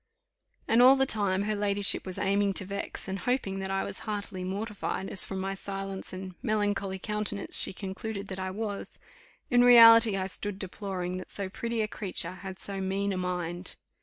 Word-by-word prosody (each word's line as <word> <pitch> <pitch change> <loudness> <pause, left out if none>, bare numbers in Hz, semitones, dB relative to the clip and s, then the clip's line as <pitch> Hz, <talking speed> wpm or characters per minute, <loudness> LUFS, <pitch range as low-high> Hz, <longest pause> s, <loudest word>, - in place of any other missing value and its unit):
And 230 +2 +4
all 260 +2 +8
the 270 0 +2
time 200 -5 +3
her 215 +1 -1
ladyship 205 -1 +1
was 185 - -4
aiming 200 0 +1
to 190 - -2
vex, 200 +1 -5
and 190 +1 -4
hoping 240 -6 -1
that 190 0 -4
I 195 0 -1
was - - -5
heartily 205 -3 -5
mortified, 195 0 -4
as - - +2
from 195 - -5
my 195 +1 -2
silence 195 0 -6
and 185 0 -7
melancholy 205 -4 -1
countenance 210 0 +2
she - - +4
concluded 200 +2 -6
that 190 0 -5
I 190 0 -3
was; 205 +1 -3 0.5
in 245 0 +5
reality 230 -3 +8
I 190 - -1
stood 195 +1 -5
deploring 185 -2 -4
that 185 - -8
so 200 -2 -4
pretty 230 +3 -3
a 215 - 0
creature 185 -5 -2
had 190 0 -8
so 195 0 -4
mean 195 +1 -1
a - - -3
mind. 180 0 -4
195 Hz, 190 wpm, -28 LUFS, 190-210 Hz, 0.5 s, all